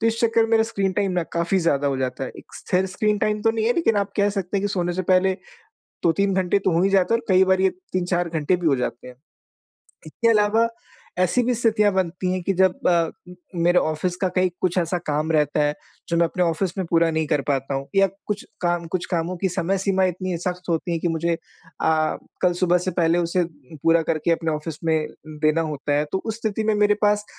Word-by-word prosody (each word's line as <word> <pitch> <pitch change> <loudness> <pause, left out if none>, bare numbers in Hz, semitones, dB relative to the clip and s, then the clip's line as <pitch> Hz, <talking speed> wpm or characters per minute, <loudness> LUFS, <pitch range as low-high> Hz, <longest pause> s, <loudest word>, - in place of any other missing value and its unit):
तो 230 - +1
इस 230 0 0
चक्कर 230 -1 +3
मेरा 225 0 +4
स्क्रीन 200 -4 -1
टाइम 195 0 0
ना 180 -1 0
काफ़ी 170 +3 +1
ज़्यादा 145 -5 +1
हो 140 -1 0
जाता 130 0 -3
है। - - -6
एक - - -15
स्थिर 185 +1 0
स्क्रीन 210 +3 0
टाइम 210 +1 0
तो 225 - +4
नहीं 225 -1 -1
है 240 - +4
लेकिन 225 -10 +2
आप 200 0 0
कह 205 0 +3
सकते 195 -1 -3
हैं 195 - 0
कि 205 - 0
सोने 175 -2 -1
से 185 +2 -2
पहले 185 +1 +3 0.7
2-3 195 +4 +2
घंटे 190 +1 +1
तो 190 - 0
हो 170 +2 +2
ही 195 - +3
जाते 195 +2 +3
हैं 230 - +3
और - - -23
कई 185 +1 +6
बार 190 0 +2
ये 190 - +4 0.2
3-4 175 -1 0
घंटे 160 +2 +1
भी 175 -2 -1
हो 140 - +4
जाते 125 -1 -4
हैं। 125 - -11 0.9
इसके 230 +9 0
अलावा 220 +1 +3 0.5
ऐसी 185 +7 +2
भी 245 +1 +1
स्थितियाँ 215 -3 +2
बनती 185 0 -1
हैं 185 -1 -2
कि 195 - 0
जब 185 0 +1
अ, 170 -2 +2 0.4
मेरे 175 +1 +3
ऑफ़िस 155 +3 -1
का 190 - +2
कहीं 185 0 +1
कुछ 180 -1 0
ऐसा 175 +1 0
काम 150 +2 -1
रहता 150 -1 +2
है 145 0 +1 0.3
जो 170 - 0
मैं 170 - +4
अपने 180 +2 -2
ऑफ़िस 170 +2 -1
में 190 - 0
पूरा 165 0 +3
नहीं 160 -1 -1
कर 145 - +1
पाता 135 -1 -1
हूँ। 135 0 -3
या 195 0 +6 0.2
कुछ 205 -1 -3 0.2
काम 175 -1 0
कुछ 185 -1 -1
कामों 175 0 -1
की 190 +2 0
समय-सीमा 190 +1 0
इतनी 185 0 -2
सख़्त 180 +1 -4
होती 170 +1 -1
है 165 - 0
की 170 - -1
मुझे 165 +1 0
अ, 160 -2 -2 0.3
कल 180 - +4
सुबह 180 -1 +3
से - - +1
पहले 170 -1 +2
उसे 175 +1 +1 0.4
पूरा 165 0 +4
करके 160 0 -1
अपने 165 -1 -1
ऑफ़िस 150 0 -5
में, 160 -1 +1 0.2
देना 155 +1 0
होता 150 -2 -3
है। 150 - +1
तो 190 - +1
उस 220 -1 -2
स्थिति 220 -1 -2
में 215 0 +2
मेरे 210 0 +3
पास 210 0 +3
180 Hz, 235 wpm, -23 LUFS, 165-195 Hz, 0.9 s, कई